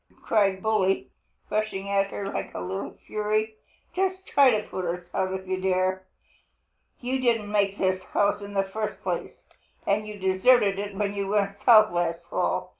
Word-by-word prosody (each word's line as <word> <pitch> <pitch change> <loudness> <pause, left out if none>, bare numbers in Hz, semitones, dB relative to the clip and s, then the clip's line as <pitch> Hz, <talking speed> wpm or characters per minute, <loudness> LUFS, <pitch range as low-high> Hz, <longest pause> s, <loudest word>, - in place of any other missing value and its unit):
cried 195 -3 +2
Bully, 205 -3 +1 0.4
rushing 210 -2 -1
at 200 0 +2
her 200 - -5
like 195 - -4
a - - -3
little 190 +2 -5
fury. 215 +1 -1 0.4
"Just 380 0 -1
try 280 -2 +5
to 215 -3 0
put 185 - -4
us 175 0 -4
out 185 - 0
if 190 0 -5
you 185 0 -2
dare! 185 0 0 0.9
You 260 +2 -1
didn't 230 -5 +1
make 200 -1 +1
this 185 -1 +1
house 205 0 +1
in 200 0 -8
the 195 - +3
first 215 +3 -5
place, - - -4 0.4
and 210 +2 +1
you 210 -1 -7
deserted 195 +2 +3
it 205 0 -5
when 200 0 -1
you 200 -1 -2
went 200 0 0
south 215 -3 +7
last 170 -1 -1
fall. - - 0
200 Hz, 175 wpm, -26 LUFS, 190-215 Hz, 0.9 s, south